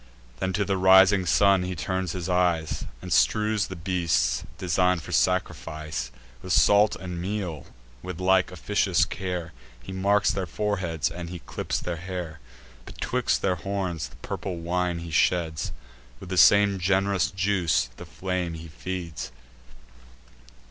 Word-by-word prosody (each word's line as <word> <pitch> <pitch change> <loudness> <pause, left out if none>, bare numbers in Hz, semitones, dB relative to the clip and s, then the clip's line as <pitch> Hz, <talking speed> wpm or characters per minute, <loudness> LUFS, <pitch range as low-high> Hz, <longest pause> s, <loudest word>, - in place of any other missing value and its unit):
Then 95 - -1
to 100 +2 0
the 95 0 0
rising 95 0 +6
sun 100 0 +4
he 90 0 -3
turns 95 +2 -2
his 90 -2 -4
eyes, 90 -3 +1 0.2
And 90 - -2
strews 105 +3 +2
the 95 - -7
beasts, 85 -8 0
design'd 90 -2 +1
for - - -9
sacrifice, 80 -7 -1 0.3
With 90 - -2
salt 105 +4 +5
and 90 -2 -6
meal: 90 -6 -4 0.3
with 90 +2 -7
like 95 0 +3
officious 95 +1 +1
care 90 -3 -4 0.3
He 70 - -8
marks 100 +2 +2
their 95 -2 -3
foreheads, 90 -5 -1
and 85 -1 -6
he 90 - -6
clips - - -4
their 90 -1 -4
hair. 90 -2 -6 0.5
Betwixt - - -1
their 90 -2 +1
horns 95 -3 -3
the - - -18
purple 90 -3 -5
wine 90 +1 -1
he 85 0 -7
sheds; 80 -1 +1 0.5
With 90 - -10
the 95 - -2
same 100 +1 +6
gen'rous 95 -2 +1
juice 95 -9 +1
the - - -9
flame 90 -3 -3
he 80 0 -9
feeds. 85 -3 -6
90 Hz, 145 wpm, -26 LUFS, 85-95 Hz, 0.5 s, rising